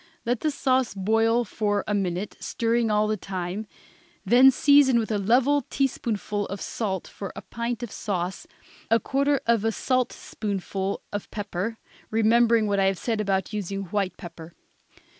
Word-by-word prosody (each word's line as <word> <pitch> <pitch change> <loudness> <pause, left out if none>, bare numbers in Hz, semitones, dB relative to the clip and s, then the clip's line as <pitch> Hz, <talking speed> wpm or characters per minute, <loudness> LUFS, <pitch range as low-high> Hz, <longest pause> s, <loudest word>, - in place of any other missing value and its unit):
Let 240 0 0
the 310 - 0
sauce 260 -5 +1
boil 225 +4 +2
for 205 -1 -1
a 210 - 0
minute, 190 0 -2
stirring 230 0 0
all 210 0 +3
the 215 0 0
time, 190 +2 -4 0.6
then 255 +3 +7
season 275 -1 +5
with 225 -1 -1
a 210 - +1
level 250 +8 +3
teaspoonful 215 -6 -1
of 200 - -6
salt 190 -5 -3
for 200 - -7
a - - -8
pint 235 +1 -4
of 235 - -5
sauce, 185 -3 -3 0.4
a 225 +1 +4
quarter 280 +3 +1
of 230 -2 +2
a 225 - +2
saltspoonful 205 -6 -2
of 205 - -4
pepper, 205 +1 -4 0.3
remembering 225 +1 +4
what 200 -1 +1
I 195 - +3
have 195 -1 +1
said 225 +1 -1
about 195 -1 -1
using 195 -1 -3
white 200 -3 -1
pepper. 170 -2 -10
215 Hz, 160 wpm, -25 LUFS, 195-235 Hz, 0.6 s, then